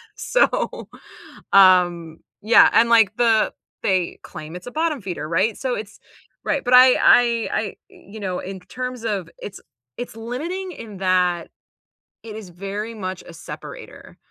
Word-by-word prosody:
so, - - 0 0.6
um 175 -4 +4 0.2
yeah, 220 +3 +6
and 230 +1 +4
like 220 -3 +4
the 230 -2 +2 0.3
they 185 -3 0
claim 155 +2 -9
it's 180 +6 -10
a - - -7
bottom 310 -4 -1
feeder, 175 -5 -5
right, 185 +7 0
so 255 -2 -2
it's 205 -1 -8 0.5
right, 285 - -1
but 250 0 0
I 255 0 +8
I 235 -2 +3
I - - -2
you 350 - -14
know 185 -2 -3
in 190 0 -7
terms 250 +4 -6
of 195 -6 -3
it's 200 - -8 0.4
it's 245 -2 -7
limiting 325 +12 -5
in 215 - -10
that 180 -2 0 0.7
it 220 -2 -9
is 205 -4 -10
very 200 +5 -6
much 185 -3 -5
a 170 - -11
separator. 475 - -11
210 Hz, 150 wpm, -21 LUFS, 185-245 Hz, 0.7 s, I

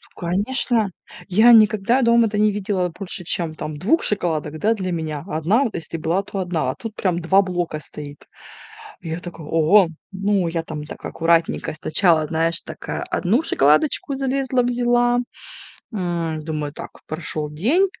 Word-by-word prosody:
Конечно, 210 +4 0 0.4
я 220 +5 +6
никогда 215 +3 +4
дома 235 -1 +5
это 210 -1 -3
не 210 0 +4
видела 195 -3 -1
больше, 185 -2 -3
чем 165 -1 -1
там 150 -1 -6
2 225 - +2
шоколадок, 155 -6 -2
да, 220 +2 +2
для 185 -3 -3
меня. 155 -3 -3
1 175 - +1
вот 230 -6 -2
если 165 0 -4
была, 165 +5 0
то 195 - -6
одна, 175 -7 -1
а - - -3
тут 225 -2 -8
прям 180 -3 0
2 185 +4 +4
блока 175 -5 -3
стоит. 145 -1 -10 0.8
Я 165 -1 -4
такая: 175 -3 -9
о! 165 +4 +5 0.2
Ну, 195 -2 0
я 165 0 -2
там 150 -2 -6
так - - -11
аккуратненько 165 -1 +1
сначала, 155 0 +2
знаешь, 165 +2 0
такая - - -6
1 220 - 0
шоколадочку 155 - +2
залезла, 265 -1 0
взяла. 245 0 +2 0.8
М. 170 -4 -2
Думаю, 150 -2 -4
так - - -8 0.2
прошёл 155 -1 -4
день, 250 - +2
180 Hz, 155 wpm, -21 LUFS, 160-215 Hz, 0.8 s, я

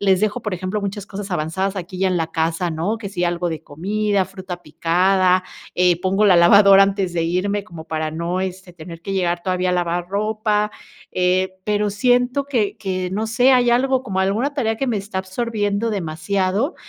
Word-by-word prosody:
les 190 -2 +3
dejo, 215 +2 -1
por 210 - -3
ejemplo, 185 +3 -3
muchas 200 0 -4
cosas 200 0 -7
avanzadas 185 +4 -2
aquí 185 0 -6
ya 190 0 +2
en 180 -1 0
la 165 - 0
casa, 165 +2 -1
¿no? 170 +7 -2
Que 210 -3 -6
si, 180 -2 -2
algo 175 0 -1
de 160 -2 -5
comida, 200 +5 -1
fruta 185 -2 -8
picada, 180 +3 +2 0.3
eh, 180 -1 +3
pongo 195 +3 +2
la 185 -3 +6
lavadora 195 +3 +7
antes 195 -2 0
de 165 - +1
irme 190 +4 -1
como 170 -5 -10
para 155 -1 -3
no, 170 +3 -2
este, 185 -1 -6
tener 165 0 -10
que 195 - -5
llegar 175 -2 0
todavía 185 -1 0
a - - 0
lavar 175 0 -1
ropa, 210 +1 0 0.4
eh, 185 +1 +1
pero 210 0 +1
siento 245 +5 +2
que 240 -8 -1
que, 185 -2 -3
no 210 +4 -2
sé, 245 +4 +4
hay 245 -2 +4
algo 260 +2 +2
como 195 -6 -2
alguna 215 +9 0
tarea 225 -6 -1
que 270 - -2
me 225 -4 0
está 195 -1 -5
absorbiendo 205 +2 -2
demasiado 195 - -1
190 Hz, 195 wpm, -20 LUFS, 175-210 Hz, 0.4 s, lavadora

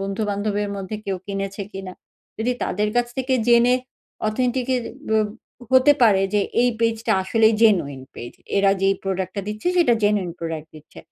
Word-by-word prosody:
বন্ধু-বান্ধবের 205 +1 -2
মধ্যে 195 +2 -5
কেউ 195 - -1
কিনেছে 195 0 -4
কিনা? 190 -1 -7 0.5
যদি 235 +3 0
তাদের 210 +3 0
কাছে 240 0 +1
থেকে 260 0 0
জেনে 240 +1 +5 0.5
authentic 250 +3 0
এর 245 - -3 0.2
ব্য 220 - +2 0.6
হতে 260 +3 +7
পারে, 200 -4 +5
যে 205 - +4 0.2
এই 245 - +4
পেজটা 230 -1 +1
আসলেই 220 +3 +3
genuine 145 -11 +2
পেজ। 120 - -8 0.2
এরা 195 0 +4
যেই 195 0 +3
প্রোডাক্টটা 190 +1 -2
দিচ্ছে 215 +11 -2
সেটা 330 -9 +4
genuine 205 -4 +1
প্রোডাক্ট 165 -2 -4
দিচ্ছে। 155 0 -14
210 Hz, 155 wpm, -22 LUFS, 195-235 Hz, 0.6 s, হতে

